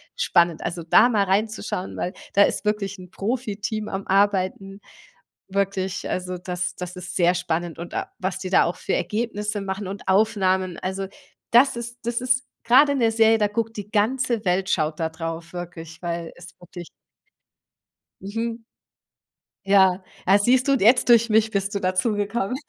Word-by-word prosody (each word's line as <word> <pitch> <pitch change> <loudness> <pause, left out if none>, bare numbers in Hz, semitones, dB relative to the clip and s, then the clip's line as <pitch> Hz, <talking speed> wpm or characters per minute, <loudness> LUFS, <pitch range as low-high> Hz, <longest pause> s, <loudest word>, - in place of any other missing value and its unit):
spannend. 170 - +2
Also, 170 -1 -4
da 215 +8 +5
mal 210 -4 +2
reinzuschauen 200 -1 -2
weil 180 - -3 0.2
da 200 - +6
ist - - 0
wirklich 210 -1 -1
'n 180 - -11
Profiteam 215 -1 -3
am 195 -1 -5
Arbeiten 195 0 +1 0.7
wirklich, 195 -1 -2
also, 180 0 -3
das 180 0 -4
das 180 0 -7
ist 180 0 -7
sehr 175 -1 +4
spannend 175 -2 -3
und 170 +1 -7
a - - -3
was 190 0 -3
die 185 -1 -5
da 185 - +5
auch 170 - -2
für - - -2
Ergebnisse 210 -2 -2
machen 195 0 -4
und 195 0 -7
Aufnahmen. 190 -3 +2
Also, 190 +1 -3 0.5
das 240 +2 +5
ist 235 +1 -6
das 235 +1 -1
ist 255 0 +1 0.2
grade 270 +5 +6
in 275 - -1
der 225 -1 +3
Serie, 225 0 +4
da 210 -1 +2
guckt 225 +2 -3
die 205 -1 -7
ganze 230 +1 0
Welt 185 +1 0
schaut 155 -2 0
da 160 - 0
drauf 165 0 -6
wirklich, 170 -2 -8
weil 170 -1 -4
es 175 0 -12
wirklich 175 -1 -10 1.3
Mhm. 225 +3 -4 1.0
Ja. 195 -1 +4 0.2
Ah, 195 +2 +6
siehst 250 +5 +3
du 275 - +5
und 270 - +1
jetzt 245 +5 +5
durch 235 -1 +6
mich 220 0 +3
bist 200 0 -2
du - - 0
dazugekommen. 205 +4 -1
195 Hz, 170 wpm, -23 LUFS, 180-225 Hz, 1.3 s, da